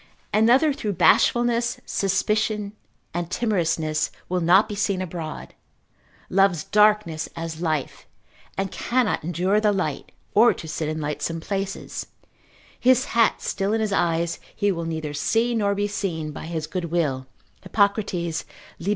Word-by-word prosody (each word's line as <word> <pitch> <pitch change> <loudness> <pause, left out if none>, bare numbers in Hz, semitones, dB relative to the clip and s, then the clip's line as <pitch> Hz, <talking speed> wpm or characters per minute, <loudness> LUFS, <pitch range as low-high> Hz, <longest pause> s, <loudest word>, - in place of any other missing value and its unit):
Another 245 +8 +4
through 215 -7 -3
bashfulness, 240 +5 +3
suspicion, 210 +1 0 0.4
and 170 0 -3
timorousness 165 -8 0 0.2
will 180 0 0
not 185 +6 +5
be 215 - -5
seen 200 -2 0
abroad, 170 -3 -6 0.7
loves 190 -4 +3
darkness 210 -6 +2
as 165 -1 -5
life, 155 -5 -2 0.5
and 195 0 -1
cannot 245 -7 0
endure 180 +5 +1
the 210 -1 +3
light, 180 -8 -2 0.2
or 230 +3 +6
to 160 - -8
sit 155 0 -3
in 155 0 -3
lightsome 150 +2 -3
places, 195 +3 -4 0.7
his 255 +1 +4
hat 230 -1 +3
still 195 +1 -1
in 225 - +1
his 215 -2 0
eyes, 170 -2 0 0.2
he 205 0 +1
will 170 -3 -3
neither 160 -2 -4
see 225 +11 +1
nor 200 -3 +1
be 205 +1 0
seen 170 -7 -3
by 160 - -8
his 160 -2 -3
goodwill, 160 -7 -2 0.3
Hippocrates, 200 -5 0 0.3
lib. 185 - -3
190 Hz, 140 wpm, -24 LUFS, 165-210 Hz, 0.7 s, or